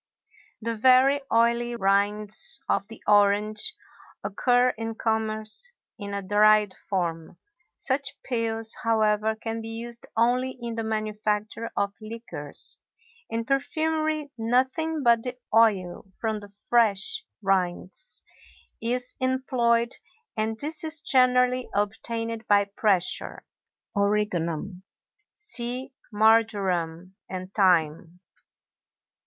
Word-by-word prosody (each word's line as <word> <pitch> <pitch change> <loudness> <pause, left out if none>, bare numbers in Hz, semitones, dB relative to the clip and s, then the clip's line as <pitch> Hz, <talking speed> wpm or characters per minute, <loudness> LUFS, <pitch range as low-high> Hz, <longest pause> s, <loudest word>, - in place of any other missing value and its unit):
The 230 0 -1
very 260 +5 +5
oily 235 +1 +2
rinds 210 - +2
of 200 - 0
the 225 - -12
orange 210 - +3 0.5
occur 245 +4 +3
in 225 -1 -4
commerce 220 - -2 0.3
in 200 -1 -5
a 200 - -3
dried 210 0 +4
form; 170 -3 -3 0.4
such 275 +1 -1
peels, 225 -2 -1
however, 220 -1 +2
can 225 0 -4
be 225 - -7
used 235 +1 -6
only 250 +3 +2
in 235 -1 -4
the 225 0 -3
manufacture 215 0 -2
of 200 0 0
liqueurs; 215 -10 -6 0.5
in 230 0 -2
perfumery 310 +2 0
nothing 260 +7 +1
but 235 -2 +5
the 250 +1 -5 0.2
oil 195 -4 +2
from 220 -2 -1
the 205 0 -12 0.2
fresh 235 - +2 0.2
rinds 190 - -1 0.6
is 245 +2 -1
employed, 250 -2 +1 0.4
and 220 0 -1
this 310 +2 -2
is 320 0 -1
generally 255 -3 +3
obtained 225 +2 -2
by 205 -1 +5
pressure. 200 -2 0 0.5
ORIGANUM. 200 -3 0 0.5
See 255 - -1 0.2
Marjoram, 195 -6 +2 0.2
and 185 0 -6
Thyme. 170 -3 +2
225 Hz, 100 wpm, -26 LUFS, 205-245 Hz, 0.6 s, very